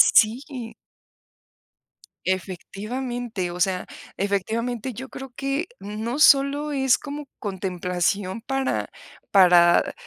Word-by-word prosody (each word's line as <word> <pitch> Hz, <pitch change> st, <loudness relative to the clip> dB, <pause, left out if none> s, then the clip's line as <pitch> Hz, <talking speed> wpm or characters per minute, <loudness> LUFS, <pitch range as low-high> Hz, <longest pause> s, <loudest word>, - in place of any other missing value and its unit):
sí. 240 Hz, 0 st, +2 dB, 1.5 s
Efectivamente, 205 Hz, +3 st, -3 dB
o 175 Hz, -, -7 dB
sea, 185 Hz, 0 st, +1 dB, 0.3 s
efectivamente 225 Hz, +5 st, -1 dB
yo 265 Hz, +4 st, -7 dB
creo 270 Hz, -1 st, -8 dB
que, 275 Hz, +5 st, -1 dB
no 220 Hz, +6 st, -4 dB
solo 285 Hz, +1 st, +5 dB
es 265 Hz, -3 st, +3 dB
como 290 Hz, 0 st, -7 dB
contemplación 185 Hz, +1 st, -2 dB
para 270 Hz, +1 st, -1 dB, 0.4 s
para 175 Hz, -3 st, +6 dB
225 Hz, 90 wpm, -24 LUFS, 190-265 Hz, 1.5 s, para